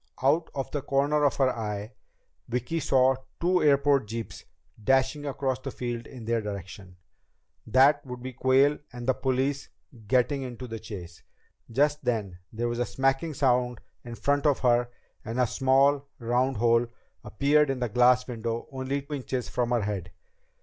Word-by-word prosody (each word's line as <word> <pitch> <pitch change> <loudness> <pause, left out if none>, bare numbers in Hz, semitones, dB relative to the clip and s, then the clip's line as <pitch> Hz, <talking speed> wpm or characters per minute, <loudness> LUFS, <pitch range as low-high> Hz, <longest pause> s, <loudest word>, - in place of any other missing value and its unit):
Out 155 +5 +3
of 135 -1 -3
the 145 - -2
corner 145 +2 +1
of 140 - +2
her 130 -2 +2
eye, 105 -1 -4 0.6
Vicki 125 +7 -2
saw 130 -2 +3 0.2
two 180 +1 +2
airport 140 -4 +3
jeeps 115 +1 -6 0.4
dashing 135 +4 +2
across 135 -2 -1
the 135 - -6
field 120 -2 -5
in 125 -5 -10
their 115 0 0
direction. 95 -2 -8 0.7
That 135 +5 +5
would 125 -1 -7
be 130 0 -6
Quayle 135 +4 +3
and 120 -1 -7
the 130 - +3
police 135 +2 -1 0.4
getting 130 +4 +2
into 125 -1 -6
the 115 -1 -6
chase. 90 -6 -9 0.5
Just 145 +5 +1
then 105 -8 -2
there 115 +2 -2
was 120 0 -3
a 120 - +1
smacking 135 +4 0
sound 125 -4 +1 0.2
in 120 -1 -7
front 145 +4 +1
of 145 - +2
her 120 -1 +3 0.3
and 115 +3 -4
a 125 - +4
small 135 +3 +2
round 125 +1 0
hole 115 +1 +3 0.4
appeared 145 +4 +2
in 135 - 0
the 125 -1 -1
glass 125 +2 +4
window 115 -1 -4
only 135 +1 -2
inches 130 -3 -3
from 120 -1 -1
her 120 -3 +1
head. 100 -4 -4
130 Hz, 165 wpm, -27 LUFS, 115-140 Hz, 0.7 s, That